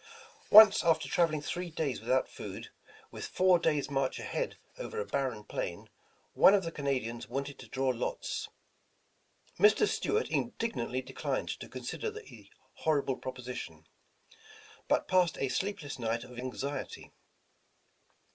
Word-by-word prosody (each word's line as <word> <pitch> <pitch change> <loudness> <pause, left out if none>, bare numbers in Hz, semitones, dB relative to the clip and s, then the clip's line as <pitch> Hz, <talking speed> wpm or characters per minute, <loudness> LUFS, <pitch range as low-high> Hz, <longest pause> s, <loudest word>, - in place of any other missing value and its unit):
Once, 215 -2 +9
after 160 -2 +2
traveling 165 -5 +1
three 175 +6 -3
days 155 -6 -2
without 130 +3 +1
food, - - -8 0.4
with - - -6
four 185 -1 +4
days' 150 -4 +1
march 135 -1 0
ahead - - -3 0.2
over 460 -2 -5
a 465 - -2
barren - - -2
plain, - - -5 0.4
one 195 - +7
of 195 - +1
the 165 - -4
Canadians 130 -6 -3
wanted 140 +1 -4
to - - -10
draw 135 0 0
lots. 125 -1 -3 1.1
Mr. 425 0 +6
Stuart 435 +2 0
indignantly 130 - -2
declined - - -3
to - - -6
consider - - -4
the 440 +1 -12 0.3
horrible 145 -4 +1
proposition, 125 -1 -7 1.0
but - - +2
passed 185 -3 +3
a 135 - -1
sleefjless 170 -1 -3
night 115 0 -1
of 125 -1 -10
anxiety. 135 +2 -5
145 Hz, 130 wpm, -31 LUFS, 130-185 Hz, 1.1 s, Once